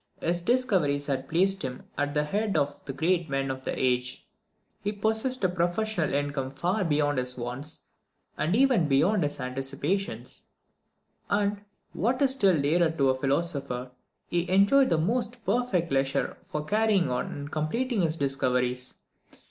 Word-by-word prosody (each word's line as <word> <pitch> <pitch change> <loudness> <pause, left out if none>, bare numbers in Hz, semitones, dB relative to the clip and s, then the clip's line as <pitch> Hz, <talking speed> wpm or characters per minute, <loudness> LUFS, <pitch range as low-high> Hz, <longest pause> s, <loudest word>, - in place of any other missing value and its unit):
His 175 +1 0
discoveries 180 - +1
had 135 -2 -2
placed 190 +3 +2
him 130 -2 -5
at 145 +1 -1
the 150 - +3
head 200 +5 -1
of 145 -1 -1
the 140 - -4
great 165 +3 0
men 135 -1 -1
of 130 0 -6
the - - -3
age; 125 0 0 0.6
he 205 - 0
possessed 220 +4 -1
a - - +5
professional 175 +1 0
income 140 -1 -1
far 180 +9 -1
beyond 145 -4 +1
his 125 0 -4
wants, 125 +6 -5 0.5
and 160 +5 0
even 250 - +4
beyond 175 +9 +3
his 145 -1 -2
anticipations; 135 +9 -3 0.8
and, 205 0 +1 0.3
what 250 +4 0
is 270 - +5
still 195 - +3
dearer 160 +4 +3
to 140 -5 +2
a - - 0
philosopher, 140 -3 -2 0.4
he 175 0 -1
enjoyed 200 +9 +5
the 165 - +3
most 230 +6 -1
perfect 195 -10 0
leisure 135 0 0
for 150 0 -4
carrying 205 -5 +2
on 125 - -1
and 145 +1 -7
completing 220 - -1
his 165 -1 +1
discoveries. 125 -3 0
160 Hz, 155 wpm, -27 LUFS, 135-200 Hz, 0.8 s, a